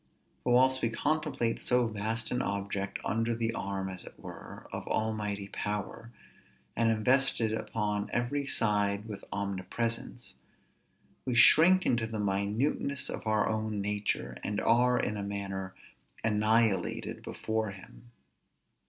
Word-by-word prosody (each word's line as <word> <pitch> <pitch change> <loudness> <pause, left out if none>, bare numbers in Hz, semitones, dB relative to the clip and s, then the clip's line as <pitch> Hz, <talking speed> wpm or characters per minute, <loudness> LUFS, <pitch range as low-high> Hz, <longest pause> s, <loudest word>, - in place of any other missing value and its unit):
But 120 - +2
whilst 130 +1 +4
we 115 - +2
contemplate 145 -2 -1
so 125 -1 +3
vast 110 +1 -2
an 125 - 0
object, 100 -2 -2
under 115 +2 0
the 115 0 -1
arm, 95 -3 -3
as 95 -1 -6
it - - -12
were, - - -10
of - - -5
almighty 105 -2 -1
power, 105 +2 -3 0.7
and 115 -1 +3
invested 115 0 +2
upon 105 -2 -2
every 135 +4 -1
side 105 -4 +1
with 105 -3 -7
omnipresence, 100 +5 -2 0.9
we 125 - -1
shrink 170 +9 +7
into 115 -2 +2
the 110 -1 -4
minuteness 105 +8 0
of - - -6
our 110 -1 +2
own 110 -1 -1
nature, 105 +1 -2
and 105 0 -1
are, 125 +2 +4
in 105 - -1
a 100 - -3
manner, 95 -2 -4 0.5
annihilated 110 -1 +1
before 110 -1 -2
him. 100 +4 -12
110 Hz, 130 wpm, -30 LUFS, 100-120 Hz, 0.9 s, shrink